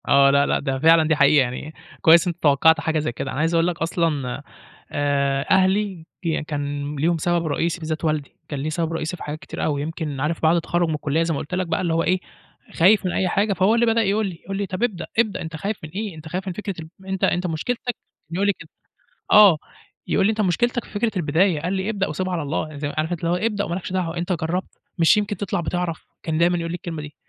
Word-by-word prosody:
آه. 140 0 +6
لا، 140 0 +4
لأ - - +1
ده 135 -1 -2
فعلًا 160 +1 +5
دي 160 - +3
حقيقة. 145 0 +5
يعني 130 +5 -5 0.3
كويس 165 +1 +6
أنت 175 - -2
توقّعت 160 +3 +5
حاجة 160 -1 0
زي 150 -5 -1
كده. 125 +3 -5
أنا 130 - -4
عايز 165 +2 +1
أقول 165 0 +3
لك 175 -1 -3
أصلًا، 165 -7 -1 0.5
آآ 140 -1 0
أهلي 190 -2 +2 0.2
ي 160 -2 -1
كان 145 -1 -4
ليهم 165 +4 +1
سبب 170 +1 0
رئيسي 165 +3 -1
بالذات 160 0 -3
والدي، 155 -3 -1
كان 145 - -3
ليه 150 +3 -2
سبب 165 0 -2
رئيسي 165 +2 -3
في - - -8
حاجات 150 +1 -5
كتير - - -6
أوي، 145 -2 0
يمكن 155 -2 -4
عارف 155 +4 -1
بعد 160 +2 +5
التخرُّج 175 0 0
من 155 - 0
الكُلّية 150 +2 0
زي 165 0 -1
ما 140 - -2
قُلت 170 +5 -4
لك 185 -1 -1
بَقى - - 0
اللي 170 -3 0
هو 165 0 +2
إيه، 185 0 +2 0.5
خايف 195 +4 +4
من 180 - 0
أي 185 - 0
حاجة، 200 +3 +1
فهو 190 +4 +3
اللي 235 0 +3
بدأ 230 0 +3
يقول 210 0 +1
لي، 175 -3 -7
يقول 195 0 -4
لي: 200 - -1
"طَب 185 +4 -4
ابدأ، 195 -9 -1
ابدأ 220 -4 +1
أنت 160 0 -6
خايف 200 +6 -3
من 155 - -7
إيه؟ 200 +1 -5
أنت 155 0 -10
خايف 185 +4 -4
من 185 - -2
فكرة 200 +1 -5
ال 170 +4 -14
أنت 190 -1 -3
أنت 180 +1 +2
مُشكلتك" 175 +9 -3
كان 245 - 0 0.4
يقول 200 +3 +1
لي 200 - +3
كده، - - -12 0.6
آه. 205 -6 +8 0.5
يقول - - +2
لي: - - +4
"أنت 220 0 0
مشكلتك 240 +6 +1
في - - -16
فكرة 220 +2 0
البداية." 165 0 +2
قال 180 +4 -2
لي: 190 +2 -1
"ابدأ 200 -3 -1
وسيبها 185 0 -3
على 170 - -1
الله." 150 +2 -2
يع 150 - -9
زي 145 0 -3
عارف 155 +2 0
أنت 175 - -2
اللي 170 -1 -1
هو - - +2
"ابدأ 205 +1 -1
وما 170 - -3
لكش 185 0 -5
دعوة، 175 -2 -1
أنت 175 +2 -1
جرّبت؟ 175 +2 -3 0.2
مش 170 +5 +5
يمكن 205 -1 -1
تطلع 190 -3 -2
بِتِعرَف؟" 175 -1 -3 0.2
كان 160 -1 -1
دايمًا 175 +2 +3
يقول 165 -1 -3
لي - - -2
الكلمة 170 -3 -6
دي، 150 0 -10
170 Hz, 255 wpm, -22 LUFS, 155-190 Hz, 0.6 s, آه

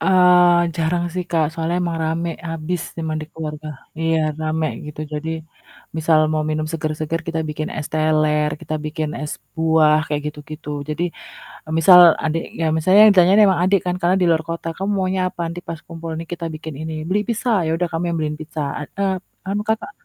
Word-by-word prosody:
Eee, 180 -2 +5
jarang 170 +1 0
sih 180 -1 -2
Kak, 165 -2 +2
soalnya 165 +1 -2
emang 170 -1 -2
rame 165 +2 -1 0.2
abis 165 +2 -3 0.2
emang 160 -1 -2
di - - -7
keluarga. 155 -1 -6 0.3
Iya 165 0 +2 0.2
rame 155 0 0 0.2
gitu, 150 0 -8
jadi 150 +1 -4 0.7
misal 160 0 +3
mau 155 0 +1
minum 155 0 -1
seger-seger 155 0 -2
kita 165 -1 -1
bikin 155 0 -3
es 150 - -3
teler, 155 -1 +2
kita 155 - -4
bikin 155 0 -3
es 150 - -4 0.2
buah 160 -1 +4
kayak 150 -1 -2
gitu 150 0 -5
gitu. 155 -1 -8 0.2
Jadi, 155 +3 -2 0.6
eee, 155 - -6
misal 180 +3 +8 0.3
adiknya 165 +1 -2
misalnya 185 +5 +4
yang 215 - +9
ditanya 180 -1 +5 0.2
emang 185 -3 +2
adik 195 +1 +3
kan 180 0 0
karena 180 +1 +3
di - - +3
luar 160 -1 +2
kota, 165 0 -5
"Kamu 195 +2 -2
maunya 190 0 0
apa? 180 - -11
Nanti 170 +2 -5
pas 165 -2 -5
kumpul 165 -1 -7
nih 165 - -6
kita 170 -1 -4
bikin 155 0 -7
ini." 160 0 -4 0.2
"Beli 200 +3 +2
pizza," 235 +2 -1 0.2
"ya - - 0
udah 175 +1 -1
kami 165 +2 -1
beliin 155 -1 -2
pizza." 155 0 -6 0.2
"Eee 150 - -6
eee, 195 -1 +1 0.4
anu 205 +2 -1
Kakak" 220 -1 -1
165 Hz, 195 wpm, -20 LUFS, 155-175 Hz, 0.7 s, yang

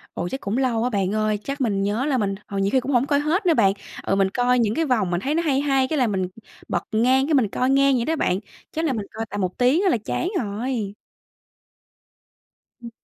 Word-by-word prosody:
Ồ, 175 - -2
chắc 265 - -5
cũng 200 +4 -2
lâu 240 -4 +1
á 250 - 0
bạn 200 -2 0
ơi, 215 -1 +1
chắc 275 +1 -4
mình 200 -6 0
nhớ 210 +6 0
là 270 -4 +1
mình, 195 -2 0
ờ, 200 - -5
nhiều 195 +1 +1
khi 260 - +4
cũng 270 +3 -3
hổng 250 +2 +3
coi 285 -1 +2
hết 355 +7 0
nữa 330 - +5
bạn. 195 -6 +4 0.3
Ờ, 195 - 0
mình 195 -1 +2
coi 250 +3 +2
những 225 -2 +1
cái 325 - +1
vòng 225 - +1
mình 175 +1 0
thấy 285 +6 -1
nó 335 - +1
hay 280 -4 +1
hay 270 -2 +1
cái 310 - -1
là 250 - +3
mình 190 -3 -1 0.4
bật - - -1
ngang 255 +5 +3
cái 310 - +1
mình 240 -7 +3
coi 255 +6 0
ngang 275 -1 +4
vậy 235 - 0
đó 320 +1 0
bạn, 185 -6 0 0.3
chắc 320 +1 -2
là 285 - +1
mình 210 -4 -3
coi 225 0 -4
tầm 205 - -3
một 185 -1 -2
tiếng 260 +9 +3
á 385 - +3
là - - +3
chán 350 - -1
rồi. 215 -1 -3 1.9
Ừm. 235 - -8
245 Hz, 260 wpm, -23 LUFS, 205-275 Hz, 1.9 s, nữa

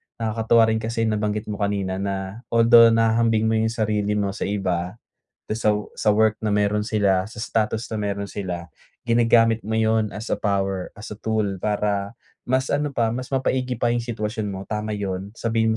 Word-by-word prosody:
nakakatuwa 115 +1 +2
rin 110 - 0
kasi 115 +1 -2
nabanggit 105 -1 -1
mo 105 - -5
kanina 100 -2 -1
na 95 +1 -4
although 115 0 +7
nahahambing 115 -1 +3
mo - - +2
yung 110 - +2
sarili 105 -2 0
mo 100 -1 0
sa 95 - -4
iba, 95 -2 -2 0.5
tas 110 +2 -3
sa 105 - +5 0.2
sa 105 - +2
work 110 0 +3
na 105 - +1
meron 105 0 +1
sila, 100 -4 +2
sa 105 +1 -9
status 110 0 -1
na - - -1
meron 100 -1 -3
sila, 90 -4 -5 0.4
ginagamit 115 -1 +4
mo 110 - -4
yun 110 -1 +1
as 105 +3 -6
a - - 0
power, 95 -2 -1
as 105 - -9
a - - -7
tool 110 -1 0 0.2
para 105 0 -1 0.3
mas 130 +1 0
ano 145 0 0
pa, 115 -4 +1
mas 125 +1 -5
mapaigi 130 -1 0
pa 120 - +2
yung 120 - 0
sitwasyon 110 -2 -3
mo. 95 - -5
Tama 105 0 -3
yun, 100 0 -4
sabihin 115 -1 +1
110 Hz, 185 wpm, -23 LUFS, 100-115 Hz, 0.5 s, although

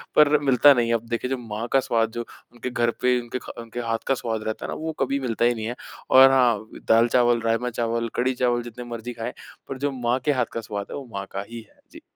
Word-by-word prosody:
पर 150 0 +6
मिलता 140 0 +6
नहीं 120 -3 +1
है। - - +2
अब 115 - -3
देखिए, 120 +1 -2
जब 130 - -1
माँ 110 +3 -3
का 135 - +6
स्वाद 115 -3 0
जो, 120 +1 -5 0.3
उनके 120 +1 -5
घर 120 -1 +1
पे, 125 0 +3
उनके 120 +2 -5
खा - - -9
उनके 115 +1 -7
हाथ 115 -1 -1
का 135 - +3
स्वाद 115 -3 -3
रहता 110 0 -4
है - - -4
ना, - - -4
वो 160 +1 -4
कभी 135 +1 0
मिलता 120 -3 0
ही 120 - +4
नहीं 110 -1 -5
है, 120 +2 -3 0.3
और 135 0 +8
हाँ, 120 -5 +2 0.2
दाल-चावल, 120 +1 +4
राजमा-चावल, 115 0 -1
कढ़ी-चावल 125 -1 +1
जितने 120 +1 -8
मर्ज़ी 120 +1 -6
खाएँ, 115 +1 -5 0.4
पर 135 - -4
जो 140 +2 -1
माँ 125 -1 -1
के 150 - +4
हाथ 125 -4 +1
का 115 - -3
स्वाद 100 -1 -5
है, - - -4
वो 140 - -7
माँ 100 0 -4
का 100 - -4
ही 115 0 -7
है। - - -29
जी। - - -13
120 Hz, 250 wpm, -24 LUFS, 115-130 Hz, 0.4 s, और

